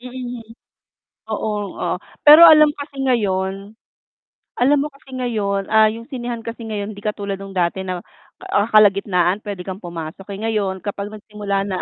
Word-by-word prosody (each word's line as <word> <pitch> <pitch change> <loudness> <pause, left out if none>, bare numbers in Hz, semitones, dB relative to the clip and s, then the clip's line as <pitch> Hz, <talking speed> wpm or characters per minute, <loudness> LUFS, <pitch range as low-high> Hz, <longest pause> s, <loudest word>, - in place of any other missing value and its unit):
Mm. 250 -1 -7 0.9
Oo, 210 -2 -3
oh. - - -2 0.2
Pero 305 +3 +10
alam 305 -2 +8
kasi 285 -1 -7
ngayon 200 -5 -1 0.9
alam 280 +4 +4
mo 290 +1 -2
kasi 270 -1 -13
ngayon, 205 -5 -1
ah, 220 0 +6
yung 230 +1 -7
sinehan 240 -4 -6
kasi 230 +1 -7
ngayon, 210 0 -4
hindi 200 - -12
katulad 205 -1 -3
no'ng 195 -1 -9
dati 175 +2 0
na, 185 -1 -4 0.5
ah, 205 +3 0
kalagitnaan 200 -3 +3
puwede 200 -4 -6
kang 190 +1 -6
pumasok, 170 +1 -8
eh. 200 - -5
Ngayon, 205 -4 -2
kapag 205 0 -4
nagsimula 205 -2 -4
na 190 -2 -3
210 Hz, 155 wpm, -20 LUFS, 195-240 Hz, 0.9 s, Pero